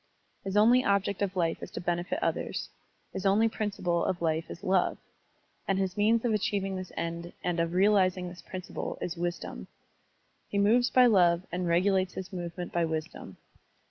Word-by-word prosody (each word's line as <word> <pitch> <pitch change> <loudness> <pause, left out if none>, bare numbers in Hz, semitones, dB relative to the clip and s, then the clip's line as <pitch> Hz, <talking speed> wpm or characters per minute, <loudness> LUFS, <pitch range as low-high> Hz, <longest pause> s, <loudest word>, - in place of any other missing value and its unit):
His 195 +1 -2
only 240 +4 +6
object 200 0 +1
of 195 -1 -1
life 170 -3 0
is - - -6
to - - -4
benefit 175 +1 -1
others, - - -2 0.4
his 190 - -4
only 205 +3 +4
principle 195 -6 -1
of 180 - -1
life 160 -1 -1
is 170 - -9
love, 185 -2 +2 0.7
and 195 - +1
his 190 -1 -1
means 220 +3 +2
of 230 - +2
achieving 200 -2 -1
this 185 -1 -6
end 170 +1 -4
and 175 -1 -1
of 165 0 0
realizing 185 -2 +3
this 175 -1 -9
principle 185 +1 -6
is 175 - -3
wisdom. 175 0 -4 0.8
He 200 - -2
moves 230 +5 +4
by 255 -1 +6
love 175 -6 +4
and 180 0 -2
regulates 185 +2 +2
his 190 +1 -7
movement 175 0 -5
by 170 - +2
wisdom. 160 -1 -4
185 Hz, 175 wpm, -29 LUFS, 175-200 Hz, 0.8 s, only